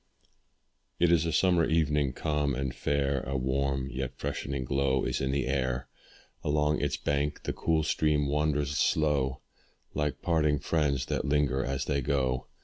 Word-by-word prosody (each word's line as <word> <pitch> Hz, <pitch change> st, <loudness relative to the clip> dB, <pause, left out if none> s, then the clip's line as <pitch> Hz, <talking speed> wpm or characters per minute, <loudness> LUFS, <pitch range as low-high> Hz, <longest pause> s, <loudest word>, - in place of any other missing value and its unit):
It 85 Hz, -1 st, +4 dB
is 85 Hz, -1 st, +3 dB
a -, -, 0 dB
summer 90 Hz, 0 st, +3 dB
evening, 75 Hz, -4 st, +1 dB
calm 75 Hz, -2 st, 0 dB
and 65 Hz, -1 st, -2 dB
fair, 70 Hz, 0 st, 0 dB
A 70 Hz, +1 st, -3 dB
warm, 65 Hz, +1 st, 0 dB
yet 65 Hz, +1 st, -4 dB
freshening 70 Hz, -2 st, -3 dB
glow 70 Hz, 0 st, +1 dB
is -, -, -1 dB
in 65 Hz, -, 0 dB
the 70 Hz, 0 st, 0 dB
air; 65 Hz, -1 st, -1 dB, 0.5 s
Along 75 Hz, 0 st, +1 dB
its 75 Hz, -, 0 dB
bank, 70 Hz, 0 st, -1 dB
the -, -, -2 dB
cool 80 Hz, -1 st, +1 dB
stream 75 Hz, -1 st, +1 dB
wanders 75 Hz, -1 st, 0 dB
slow, 70 Hz, -4 st, +1 dB, 0.5 s
Like 75 Hz, -3 st, -2 dB
parting 75 Hz, -3 st, +2 dB
friends 70 Hz, -3 st, 0 dB
that -, -, -2 dB
linger 70 Hz, -2 st, +1 dB
as 65 Hz, +1 st, -2 dB
they 70 Hz, -1 st, 0 dB
go. 65 Hz, -2 st, 0 dB
70 Hz, 155 wpm, -29 LUFS, 65-75 Hz, 0.5 s, It